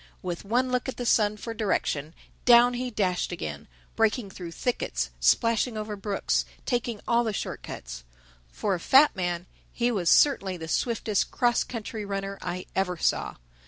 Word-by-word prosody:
With 175 -2 -4
one 250 +5 +1
look 250 +1 0
at - - -6
the 245 - -3
sun 210 -2 +3
for 230 +2 -6
direction, 165 -8 -1 0.3
down 245 0 +7
he 250 +1 -2
dashed 190 -7 0
again, 75 - -5 0.3
breaking 220 -2 +1
through 175 -3 -8
thickets, 245 +8 -2
splashing 230 0 +2
over 215 0 -4
brooks, 200 0 0 0.2
taking 240 -3 -1
all 235 0 +3
the 220 -2 -2
short - - -4
cuts. - - -8 0.5
For 205 - -1
a 180 - -1
fat 270 - +5
man, 175 -2 -2 0.3
he 245 0 0
was 185 -7 +1
certainly 195 -10 +4
the 160 -1 -7
swiftest 220 +2 0
cross 240 -1 +2
country 220 -2 -6
runner 195 0 -4
I 180 +1 -4
ever 180 -2 0
saw. - - 0
210 Hz, 165 wpm, -27 LUFS, 180-240 Hz, 0.5 s, down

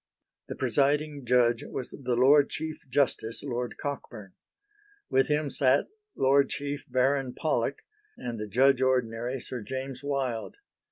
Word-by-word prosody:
The - - -5
presiding 140 +2 0
judge 120 -1 +3
was 130 - -5
the 125 -3 -2
Lord 140 +4 +5
Chief 155 0 -5
Justice, 125 -4 0
Lord 125 -3 -3
Cockburn. 115 -8 -6 0.8
With 135 0 +3
him 150 -1 0
sat 135 0 +2 0.3
Lord 135 +1 +4
Chief 145 0 -4
Baron 130 +1 +1
Pollock 140 -3 -1 0.3
and 120 -2 -5
the 105 - -4
Judge 130 +5 +4
Ordinary 125 -1 0
Sir 125 0 -6
James 130 +4 -5
Wilde. 135 - -2
130 Hz, 130 wpm, -28 LUFS, 120-140 Hz, 0.8 s, Lord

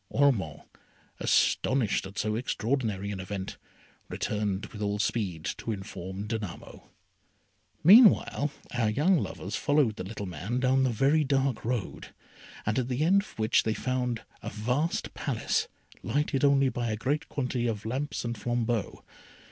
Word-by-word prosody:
Ormond, 110 - +1 0.6
astonished 120 -7 +2
at 100 +2 -13
so 105 0 0
extraordinary 110 -4 -1
an 100 - -5
event, 95 0 -5 0.5
returned 105 -2 -2
with 105 - -7
all 105 0 0
speed 100 -7 -1
to 115 - -3
inform 95 -1 -6
Danamo. 105 -5 -6 0.9
Meanwhile 195 - +7 0.2
our 115 -3 +1
young 155 - +3
lovers - - -4
followed 145 -7 +2
the - - -4
little 100 +1 -6
man 95 +8 -3
down 130 +1 +3
a - - +1
very 135 +7 +3
dark 135 -4 0
road, 120 -3 -4 0.5
at 120 +3 0
the 130 +3 0
end 195 +5 +5
of 205 - -15
which 110 +2 +3
they 110 -1 -1
found 125 -3 -2 0.2
a - - -5
vast 125 +10 -1
Palace, - - -1 0.3
lighted 145 -1 0
only 140 -1 +5
by 120 -1 -2
a 110 - -1
great 145 +7 -1
quantity 125 -3 -1
of 110 -2 -3
lamps 130 +4 -3
and 120 0 -2
flambeaux. 120 -1 -1
120 Hz, 145 wpm, -28 LUFS, 105-135 Hz, 0.9 s, Meanwhile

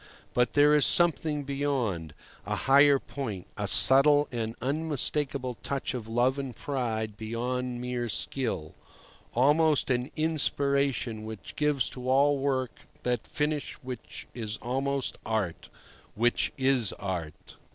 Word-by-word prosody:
But 125 0 +1
there 145 +1 +5
is 150 -1 +4
something 160 -3 +1
beyond—a 130 - -4
higher 140 +1 +5
point, 115 -10 -6
a - - -3
subtle 145 +2 +9
and 115 -2 -4
unmistakable 140 -3 -2
touch 140 -1 -3
of 120 -4 -6
love 125 +4 +1
and 135 -4 -6
pride 110 -6 -3
beyond 120 +3 -4
mere 125 -1 -4
skill; 110 - -3 0.6
almost 145 +3 +3
an 125 +2 -1
inspiration 140 -7 0
which 110 -8 -9
gives 150 -3 +1
to 125 0 -6
all 140 +2 +3
work 130 -3 -1 0.3
that 125 -2 -2
finish 150 -1 -2
which 125 -2 -8
is 110 -2 -5
almost 135 +2 -3
art—which 110 +3 -3
is 130 -5 +1
art. 90 -6 -7
130 Hz, 120 wpm, -27 LUFS, 115-140 Hz, 0.6 s, subtle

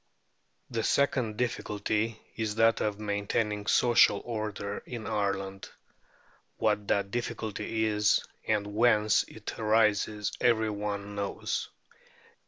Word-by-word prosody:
The 115 -2 -1
second 120 -3 +1
difficulty 110 -2 -1 0.2
is 110 -2 -2
that 115 0 +4
of 105 -1 -1
maintaining 105 0 -1
social 120 -4 +5
order 105 -3 -4
in 115 -3 -6
Ireland. 95 -1 -2 0.9
What 105 -1 +1
that 100 -1 +1
difficulty 110 -1 -2
is, 105 -1 +2 0.2
and 105 -2 +1
whence 110 -2 +4
it - - -8
arises, 110 -1 +2
every 110 -3 +3
one 105 0 -4
knows. 100 -1 -3
105 Hz, 105 wpm, -29 LUFS, 100-115 Hz, 0.9 s, social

